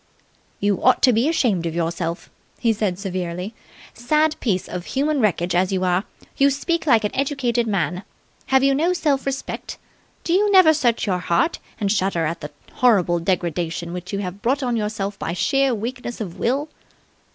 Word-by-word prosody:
"You 200 -1 0
ought 255 - +4
to 255 - +6
be 235 +7 +2
ashamed 210 - +1
of 165 - -4
yourself," 170 0 -3 0.3
he 230 -2 +2
said 205 -4 -1
severely. 185 0 -4 0.4
"Sad 305 +6 +1
piece 190 -7 -1
of 180 -1 -6
human 290 +2 0
wreckage 180 -4 +1
as 185 +2 +2
you 185 -1 0
are, 180 +2 +1 0.3
you 275 0 +5
speak 320 +4 -1
like 230 -5 +5
an 210 - -2
educated 260 -4 0
man. 180 -4 -1 0.5
Have 265 0 +3
you 275 0 +4
no 330 +6 +2
self 285 -6 0
respect? 270 0 -4 0.5
Do 335 - 0
you 410 +3 +3
never 370 -5 +7
search 245 -6 +1
your 185 -3 0
heart 175 - +1 0.2
and 200 -2 0
shudder 190 -5 +1
at 165 +2 -3
the 150 - -6 0.2
horrible 190 -8 +3
degradation 170 -1 -2
which 180 0 -6
you 200 - -2
have 195 0 -5
brought 270 +4 0
on 245 -2 0
yourself 210 -2 -3
by 165 - -3
sheer 270 +6 +1
weakness 240 +2 -5
of 190 -6 -6
will?" 275 +6 0
215 Hz, 180 wpm, -22 LUFS, 180-270 Hz, 0.5 s, never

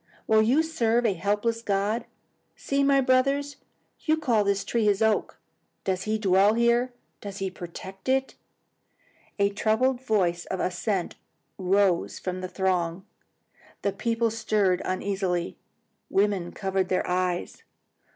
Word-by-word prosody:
Will 220 0 +4
you 255 +9 +3
serve 240 -7 +1
a 205 - +3
helpless 210 +5 -1
god? 210 +2 0 0.5
See, 275 0 0
my 275 0 +4
brothers, 275 +2 +1 0.4
you 315 0 +1
call 240 -9 +2
this 200 0 0
tree 235 -2 0
his 205 -2 +3
oak. 220 -1 +1 0.5
Does 190 -1 -1
he 215 0 0
dwell 200 +1 +4
here? 235 +2 +2 0.3
Does 200 -1 -7
he 195 -1 -3
protect 190 +4 -8
it?" 265 0 +1 1.0
A 200 -1 +2
troubled 245 +5 +1
voice 185 -8 0
of 190 - -3
assent 185 +1 -2 0.4
rose 190 -1 +2
from 185 0 -4
the 185 - -3
throng. 185 -1 -1 0.8
The 200 - 0
people 230 -1 0
stirred 210 -4 +1
uneasily. 185 -2 -1 0.5
Women 195 -3 +1
covered 190 -1 -1
their 185 - 0
eyes. 180 -1 -1
205 Hz, 130 wpm, -26 LUFS, 190-235 Hz, 1.0 s, Will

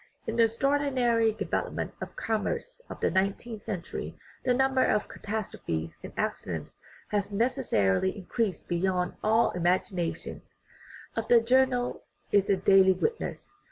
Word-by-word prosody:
In 225 - -3
the 230 - +7
extraordinary 245 -2 +2
development 215 - -3
of - - -6
commerce 225 - -2
of - - -7
the - - +2
nineteenth 200 +4 -1
century 185 -5 -5 0.3
the 255 - +2
number 265 +1 +3
of 210 - +1
catastrophes 135 - -4
and - - -8
accidents - - -3 0.3
has 205 -1 -1
necessarily 190 - +1
increased 200 +1 -2
beyond 180 +1 0
all 220 +2 +3
imagi 180 +2 +1
nation; 175 -2 -3 0.7
of - - -2
that 245 - +6
the - - -11
journal 250 0 +2 0.3
is 200 -1 +3
a 195 - +4
daily 190 0 +6
witness. 450 - -3
215 Hz, 135 wpm, -28 LUFS, 190-245 Hz, 0.7 s, the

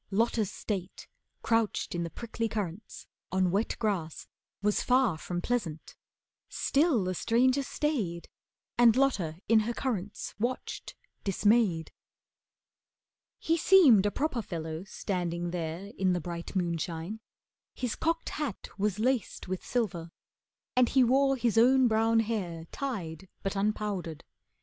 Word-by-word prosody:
Lotta's 220 0 +1
state, 195 -3 -5 0.4
Crouched 225 -2 +1
in 175 - -2
the 170 - -2
prickly 230 +3 -4
currants, 205 -2 -5 0.3
on 185 -1 +2
wet 205 +4 0
grass, 185 -8 -2 0.4
Was 210 0 +2
far 250 -7 +3
from 175 +2 -4
pleasant. 190 -11 -3 0.5
Still 280 - +2
the 185 0 -1
stranger 250 +8 +2
stayed, 240 - -2 0.5
And 235 -2 +7
Lotta 200 -13 +1
in 225 0 +6
her 230 +2 -2
currants 210 -7 -3
watched, 240 +4 -3 0.3
dismayed. 200 -4 +2 1.5
He 330 +1 +1
seemed 295 - +6
a - - +3
proper 265 +1 -1
fellow 160 -2 -5
standing 175 -3 -3
there 170 +3 -4
In 185 -1 +3
the 175 - 0
bright 170 +2 -6
moonshine. 170 +2 -2 0.6
His 250 -3 -2
cocked 330 +1 -1
hat 295 -10 -4
was 205 -1 +1
laced 245 -2 -1
With 185 0 -3
silver, 180 -9 -2 0.7
and 250 -1 +4
he 265 -1 +5
wore 270 +3 +4
his 235 -3 +2
own 255 +2 +6
brown 225 0 +3
hair 185 -8 -3
Tied, 190 - -5
but 195 0 -2
unpowdered. 200 -5 -2
210 Hz, 130 wpm, -29 LUFS, 175-240 Hz, 1.5 s, And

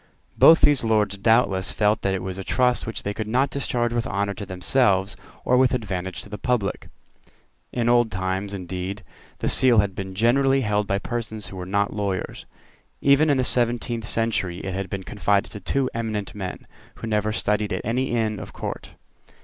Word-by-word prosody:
Both 165 - +7
these 145 -4 +4
Lords 105 -3 +1
doubtless 100 -2 +2
felt 105 +1 +2
that 95 -1 0
it 95 - -4
was 95 0 -5
a - - -4
trust 125 +3 +1
which 115 - -5
they 100 - -2
could 110 0 -4
not 130 +5 +1
discharge 120 -4 -1
with 120 -1 -1
honour 100 0 -1
to 100 -1 -8
themselves 95 +1 +1 0.3
or 125 - +4
with 130 0 +4
advantage 95 -6 -4
to - - -13
the 105 0 -7
public. 110 -5 -1 0.8
In 120 -1 -1
old 120 -2 +3
times, 95 +1 -2
indeed, 95 +1 -5 0.3
the - - -3
Seal 125 -3 +5
had 100 -2 +3
been 95 0 -6
generally 135 +5 +3
held 105 -2 0
by 100 - +1
persons 110 -1 -4
who - - -10
were 90 -1 -6
not 100 +1 0
lawyers. 100 -3 -3 0.5
Even 140 +3 +4
in 140 - +3
the 130 - +2
seventeenth 120 -2 0
century 110 -7 -1
it 95 - -4
had 95 -1 -4
been 95 0 -4
confided 100 +2 0
to 105 - -7
two 130 +7 0
eminent 110 -3 -3
men, 95 -3 -6 0.3
who - - -18
had 115 - -4
never 105 0 +1
studied 105 -1 0
at 95 - -3
any 125 +4 0
Inn 110 -3 -1
of - - -9
Court. - - -6
105 Hz, 195 wpm, -23 LUFS, 95-120 Hz, 0.8 s, Both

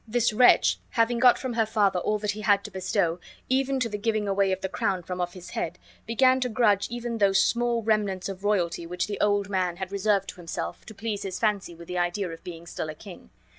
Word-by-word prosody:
This 230 0 +1
wretch, 245 +3 +5
having 235 0 +1
got 250 0 +6
from 255 -2 -4
her 225 -1 +2
father 205 -4 +2
all 210 +4 0
that 210 0 -1
he 210 +1 -7
had 205 -2 +3
to - - -8
bestow, 180 -2 0 0.3
even 270 +1 +1
to 240 - +2
the 210 -2 -5
giving 215 -1 0
away 195 0 +2
of 190 0 -2
the 190 - -1
crown 185 -1 -1
from 180 +1 -4
off 175 +1 -3
his 180 -1 -10
head, 170 +2 -3 0.3
began 255 +3 +4
to 255 -1 -1
grudge 215 -4 +2
even 240 -1 -4
those 195 -1 +4
small 235 0 +1
remnants 210 -4 0
of 195 0 -7
royalty 175 -5 0
which 180 +1 -2
the 205 - -5
old 205 -1 +2
man 185 -3 -1
had 190 0 -5
reserved 200 0 +1
to - - -8
himself, 170 -2 -6
to 220 - -10
please 210 0 -3
his 190 -2 -4
fancy 205 -6 0
with 170 0 -12
the 180 0 -2
idea 175 +3 -1
of 165 - -10
being 170 -2 -8
still 160 -2 -5
a 155 - -6
king. 185 +3 -12
200 Hz, 240 wpm, -26 LUFS, 185-225 Hz, 0.3 s, got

